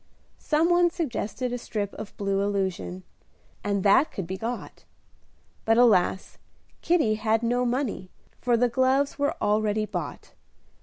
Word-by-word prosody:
Some 320 +3 +1
one 350 0 +4
suggested 255 - -3
a 245 - -3
strip 205 -4 -4
of 215 - -9
blue 195 -1 0
illusion, 190 - -2 0.6
and 200 -2 -1
that 210 +9 +4
could 190 - -5
be 185 +3 -4
got; 230 +5 -6 0.8
but, 225 0 +3
alas! 205 -6 +3 0.4
Kitty 320 -11 +2
had 220 +1 0
no 245 +1 +1
money, 240 -7 -2 0.3
for 240 -1 +2
the 245 +2 +3
gloves 260 +4 +1
were 285 0 +1
already 215 0 +1
bought. 210 - -6
225 Hz, 140 wpm, -26 LUFS, 200-255 Hz, 0.8 s, one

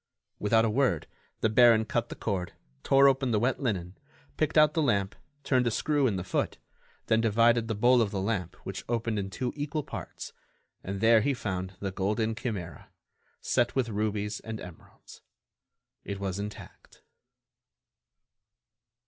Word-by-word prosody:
Without 110 +2 +3
a - - +1
word, 115 - +1 0.4
the - - +3
baron 110 0 +5
cut 120 +1 -1
the - - -6
cord, 95 -5 -3 0.3
tore 135 0 +5
open 135 -1 +2
the 110 -3 +2
wet 125 +4 0
linen, 95 -8 -3 0.4
picked 155 0 0
out 150 -1 +6
the 160 - +1
lamp, 100 -8 +1 0.3
turned 125 -3 +2
a - - +4
screw 145 +4 +1
in 105 - 0
the 90 - -3
foot, - - -2 0.5
then 110 0 +2
divided 115 +1 +3
the 110 - -2
bowl 120 +3 +4
of 110 - +1
the 100 - -3
lamp 95 -3 -2
which - - -5
opened 115 -2 -1
in 95 -1 -4
two 125 +7 -3
equal 150 +1 -3
parts - - -8 0.5
and 95 +1 -5
there 115 0 +6
he 140 +5 +1
found 95 -5 -4
the 100 -1 -2
golden 105 +4 -1
chimera, 100 - -6 0.5
set 120 - +1
with 130 -3 +1
rubies 105 0 -2
and 110 -1 -7
emeralds. 90 -3 -13 0.8
It 100 -1 -5
was 100 -1 -3
intact. 105 +1 -9
110 Hz, 160 wpm, -28 LUFS, 100-125 Hz, 0.8 s, out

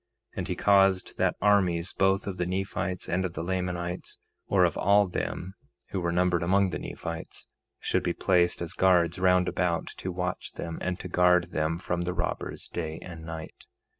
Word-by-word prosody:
And - - -3
he - - -2
caused 95 -2 +3
that - - +2
armies, 95 -4 +3
both 95 +1 +2
of 95 -2 -4
the 90 - -1
Nephites 95 -1 -2
and 90 +2 0
of 90 -2 -3
the - - -3
Lamanites, 90 -1 -3 0.3
or - - +4
of - - 0
all 100 +2 +4
them 90 0 -4 0.4
who 95 - -2
were 85 0 0
numbered 90 0 +2
among 95 +2 +3
the - - -3
Nephites, 85 -1 -6 0.3
should - - 0
be - - 0
placed 90 -2 +2
as 85 - -5
guards 90 -2 +3
round 90 -1 +4
about 85 -2 0
to 95 - -4
watch 90 +1 -3
them, 85 -1 -5
and 90 0 -2
to - - -6
guard 90 0 +3
them 80 +1 0
from 85 0 -2
the 90 +1 -2
robbers 90 0 -3
day 80 -2 -4
and 85 -3 -9
night. 80 -1 -8
90 Hz, 185 wpm, -28 LUFS, 85-95 Hz, 0.4 s, or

